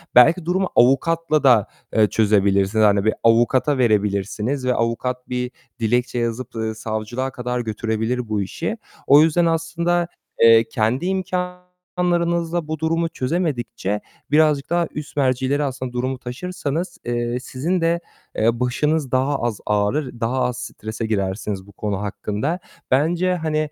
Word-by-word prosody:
belki 160 +8 +6
durumu 185 +2 0
avukatla 155 +4 +3
da, 120 -6 +5 0.3
eee, 110 -1 +5
çözebilirsiniz. 100 0 +3
Hani 100 -1 +3
bir 110 - +3
avukata 120 +5 +3
verebilirsiniz 105 +3 0
ve 125 - +2
avukat 125 +2 -2
bir 125 0 -2 0.3
dilekçe 120 +2 0
yazıp, 120 +1 -3
ııı, 110 -1 -2
savcılığa 110 +4 -3
kadar 125 -1 -3
götürebilir 110 +1 -2
bu 105 -2 0
işi. 160 - -3 0.3
O 145 +2 +8
yüzden 165 +2 +3
aslında, 170 +1 0 0.3
eee, 115 0 +8
kendi 120 +6 0
imkânlarınızla 180 -2 -2
bu 155 0 -3
durumu 165 +1 0
çözemedikçe 125 - -2 0.3
birazcık 150 -2 +3
daha 170 -1 +1
üst 150 0 -7
mercilere 130 +1 +1
aslında 130 -2 -4
durumu 130 +2 -2
taşırsanız, 165 +5 -4
eee, 120 0 -1
sizin 155 +8 -2
de, 165 +1 +2 0.4
eee, 115 +2 +1
başınız 145 +3 0
daha 135 +2 +1
az 120 -3 -1
ağrır, 110 +6 0
daha 120 +3 0
az 125 0 -1
strese 110 0 -5
girersiniz 100 -2 -2
bu - - -14
konu 105 0 -3
hakkında. 105 - -2 0.3
Bence 170 +7 +2
hani, 160 -3 -1
125 Hz, 135 wpm, -21 LUFS, 115-160 Hz, 0.4 s, O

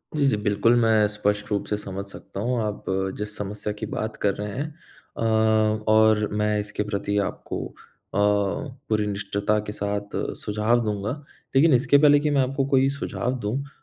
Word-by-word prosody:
जी, 145 -2 +2
जी 110 - +2
बिल्कुल। 105 +3 +2
मैं 110 -2 +4
स्पष्ट 105 0 -1
रूप 100 -1 0
से 105 - -1
समझ 100 -1 -5
सकता 100 - -9
हूँ 120 +3 0
आप 105 -1 -4 0.3
जिस 105 0 -4
समस्या 105 +1 -4
की 105 +1 -5
बात 110 0 -3
कर 100 - +3
रहे 105 - -4
हैं। 145 +3 -2 0.5
अ, - - -4 0.7
और 110 -1 +4
मैं 105 0 +1
इसके 105 0 -3
प्रति 100 0 -1
आपको - - -5
अ, - - -12
पूरी 105 +3 0
निष्ठता 100 +1 -1
के - - -3
साथ 100 0 -3 0.2
सुझाव 105 +3 +1
दूँगा। 105 0 -2 0.4
लेकिन 150 +3 +6
इसके 135 +3 +5
पहले 145 0 +6
कि 150 +1 0
मैं 140 -2 +3
आपको 135 +1 0
कोई 135 0 +5
सुझाव 130 -2 -3
दूँ, 105 +5 0
अ, - - -13
105 Hz, 180 wpm, -24 LUFS, 105-125 Hz, 0.7 s, लेकिन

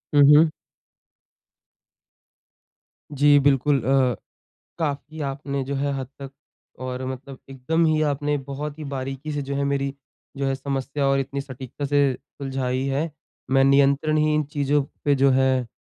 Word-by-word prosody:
हुँ, 145 - +7 0.2
हुँ। 160 0 +6 2.7
जी, 145 +1 +6
बिल्कुल 140 -1 +3
अ, 130 -1 +3 0.6
काफ़ी 155 0 -3
आपने 140 0 -3
जो 140 +2 -4
है 140 +1 -1
हद 130 - -5
तक 135 0 -8 0.5
और 130 0 -4
मतलब 130 +1 -7
एकदम 160 +6 0
ही 155 -1 +2
आपने 145 0 0
बहुत 145 +2 -6
ही 155 - -5
बारीकी 135 +3 -4
से 145 - -2
जो 140 0 -4
है 140 - 0
मेरी 140 0 -1 0.4
जो 140 - -1
है 135 - 0
समस्या 135 +1 -2
और 135 0 +3
इतनी 140 +1 -3
सटीकता 130 +1 -7
से 145 0 +2 0.4
सुलझाई 130 -2 -2
है। 145 +5 -1 0.4
मैं 135 0 +5
नियंत्रण 140 +3 +3
ही 155 0 +2
इन 155 - +2
चीज़ों 145 0 0 0.2
पे 145 - +4
जो 135 0 +4
है 130 -1 +2
140 Hz, 150 wpm, -23 LUFS, 135-145 Hz, 2.7 s, हुँ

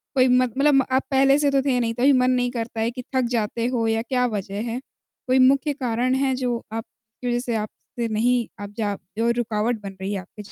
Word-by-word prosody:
कोई 255 0 +5
मत 250 -2 +3
मतलब 275 -2 +4
आप 260 +1 +2
पहले 270 +1 +5
से 285 -1 +2
तो 275 -1 +3
थे 260 -2 +1
नहीं, 230 -1 0
तभी 260 +4 +4
मन 255 0 +3
नहीं 245 -1 +1
करता 230 -2 -4
है 230 +2 0
कि 250 0 -7
थक 260 - +3
जाते 230 +1 -1
हो, 240 -3 0
या 225 0 +1
क्या 250 +1 0
वजह 200 +1 -4
है? 245 - -3 0.5
कोई 260 +1 +3
मुख्य 275 +3 +4
कारण 255 -1 0
है, 265 0 +1
जो 245 -2 -2
आप 225 0 -3 0.4
की 245 - -3
वजह 240 0 +1
से 240 -2 -2
आप 215 -1 -2 0.3
से 235 - +1
नहीं, 235 +2 +1
आप 205 0 -7
जा 205 -2 -1 0.2
जो 230 +1 +2
रुकावट 220 +1 -1
बन 195 -1 -8
रही 200 +2 -2
है 195 - -2
आपके 205 +3 -13
245 Hz, 240 wpm, -23 LUFS, 225-255 Hz, 0.5 s, कोई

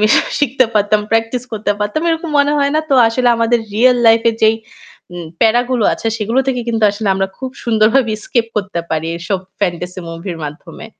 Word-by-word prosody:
আমি 215 - +4 0.3
শিখতে 265 -2 +2
পারতাম, 210 0 +2
practice 225 +2 0
করতে 210 -1 -1
পারতাম, 210 +8 -1
এরকম 330 0 -2
মনে 285 +1 +3
হয় 280 0 +1
না? 310 - +3
তো - - +4
আসলে 245 +2 +1
আমাদের 230 +1 +2 0.2
real 250 +3 +4
life-এ 225 +1 +5
যেই, 220 0 +5 0.6
উম 175 -1 -7 0.2
প্যারাগুলো 240 0 +2
আছে - - -5
সেগুলো 225 +4 -1
থেকে 250 -2 0
কিন্তু 225 -1 -1
আসলে 205 0 -4
আমরা 195 0 0
খুব 260 0 -5
সুন্দরভাবে 230 +2 +2
escape 230 +2 -1
করতে 195 -4 -2
পারি 160 0 -1
এইসব 170 +3 -2 0.2
fantasy 180 -1 -2
movie-র 165 +1 -6
মাধ্যমে। 150 +8 -9
225 Hz, 180 wpm, -16 LUFS, 205-245 Hz, 0.6 s, life-এ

